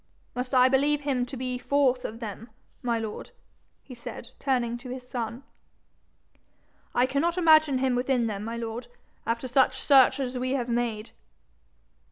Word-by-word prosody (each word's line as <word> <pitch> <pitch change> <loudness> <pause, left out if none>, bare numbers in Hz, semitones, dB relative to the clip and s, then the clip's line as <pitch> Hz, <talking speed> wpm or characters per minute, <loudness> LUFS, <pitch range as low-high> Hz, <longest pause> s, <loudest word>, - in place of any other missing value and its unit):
Must 250 +2 -3
I 255 0 +7
believe 285 +3 +2
him 260 -4 -1
to 265 - -7
be 250 0 -3
forth 260 -2 +2
of 225 +1 -5
them, 225 +1 -7 0.3
my 235 -1 0
lord?' 220 -2 -5 0.5
he 260 - -11
said, 235 0 -9
turning 245 -4 0
to 250 - -9
his 250 0 -7
son. 240 +1 -4 1.5
'I 245 - +4
cannot 295 +7 0
imagine 310 -5 +5
him 260 0 +1
within 245 -1 +1
them, 210 -2 -3
my 230 +1 -4
lord, 235 +1 -5 0.4
after 230 +3 -1
such 260 0 +3
search 265 0 +5
as 255 -1 -2
we 255 +1 -1
have 250 -3 -1
made.' 235 -2 -2
250 Hz, 160 wpm, -27 LUFS, 235-265 Hz, 1.5 s, I